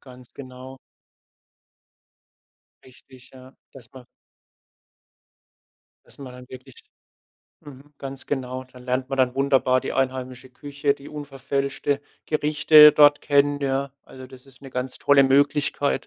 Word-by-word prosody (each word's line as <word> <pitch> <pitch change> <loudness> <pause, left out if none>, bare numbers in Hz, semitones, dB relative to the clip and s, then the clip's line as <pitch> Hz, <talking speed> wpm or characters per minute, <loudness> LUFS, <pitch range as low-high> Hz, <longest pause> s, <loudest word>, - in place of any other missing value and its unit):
Ganz 125 -2 -17
genau. 130 0 -12 2.1
Richtig, 130 0 -19
ja, 130 0 -16 0.2
dass 120 -4 -16
man 130 -1 -14 2.0
dass - - -20
man 130 -3 -10
dann 125 0 -14
wirklich 130 0 -13 0.9
mhm, 145 +1 -15
ganz 135 -1 -9
genau, 130 -2 -5
da 130 0 -18
lernt 130 +1 -3
man 135 - -5
dann 130 -1 +1
wunderbar 135 -2 +1
die - - -6
einheimische 130 -1 -4
Küche, 140 +2 -3
die 140 0 -14
unverfälschte 140 -1 -4 0.3
Gerichte 150 0 +5
dort 145 -1 +5
kennen, 145 0 +1
ja. 135 0 -2
Also, 130 0 -13
das 130 +1 -17
ist 135 0 -22
'ne 135 - -11
ganz 125 0 -5
tolle 140 -1 +4
Möglichkeit. 145 +1 +1
135 Hz, 125 wpm, -22 LUFS, 130-140 Hz, 2.1 s, Gerichte